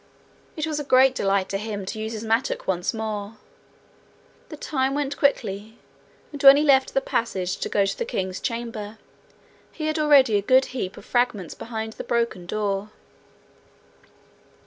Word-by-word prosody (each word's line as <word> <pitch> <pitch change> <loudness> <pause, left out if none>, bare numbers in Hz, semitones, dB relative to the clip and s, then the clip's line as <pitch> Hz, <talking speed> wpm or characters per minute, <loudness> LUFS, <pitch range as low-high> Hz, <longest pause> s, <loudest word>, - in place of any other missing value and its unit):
It 310 - -2
was 310 -2 -2
a - - -3
great 260 -1 +5
delight 195 -5 0
to 195 - -2
him 205 -2 -5
to 215 - -5
use 220 +1 -4
his 220 0 -5
mattock 225 +4 0
once 180 -2 0
more. 215 -1 -5 1.1
The 305 - -8
time 270 -2 -1
went 285 -1 -2
quickly, 220 -6 -1 0.5
and 290 -2 -7
when 275 0 +9
he 295 - +2
left 270 -3 +3
the 270 - +3
passage 190 -8 -2
to - - -4
go 200 -1 +2
to 195 - -2
the - - -3
king's 190 - -3
chamber, 230 -2 -5 0.7
he 310 - -6
had 310 0 -1
already 275 -7 +5
a - - 0
good 260 +6 +4
heap 210 -6 -4
of - - -12
fragments 240 -8 0
behind 220 -1 -6
the - - -7
broken 230 -7 -1
door. 205 0 -2
225 Hz, 170 wpm, -24 LUFS, 205-270 Hz, 1.1 s, when